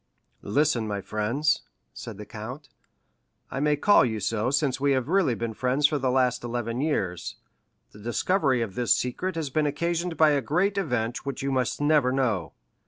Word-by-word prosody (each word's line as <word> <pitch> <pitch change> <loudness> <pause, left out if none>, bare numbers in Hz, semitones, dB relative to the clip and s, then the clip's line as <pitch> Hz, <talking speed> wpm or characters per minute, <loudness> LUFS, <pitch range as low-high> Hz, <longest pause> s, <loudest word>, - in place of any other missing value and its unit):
"Listen, 125 0 +1
my 100 -1 -2
friends," 120 +11 0 0.3
said 115 -4 -8
the 105 - -8
count—"I 125 +5 -11
may 150 +1 +2
call 205 +8 +5
you 110 -3 -1
so 110 +3 0
since 135 -1 0
we 140 -1 +3
have 130 -1 0
really 180 -9 +2
been 115 0 -3
friends 130 +5 +1
for 145 0 +3
the 130 -1 0
last 125 -1 +1
eleven 120 0 -3
years—the 100 - -5
discovery 130 - +1
of 105 -4 -6
this 120 -2 +2
secret 175 +9 -2
has 155 -4 -3
been 150 +2 +1
occasioned 170 +3 -2
by 155 -1 +5
a 145 -1 +2
great 180 - +1
event 125 -8 -2
which 140 0 -5
you 140 - -1
must 130 -2 0
never 145 -3 +3
know. 120 -9 0
130 Hz, 170 wpm, -26 LUFS, 115-150 Hz, 0.3 s, call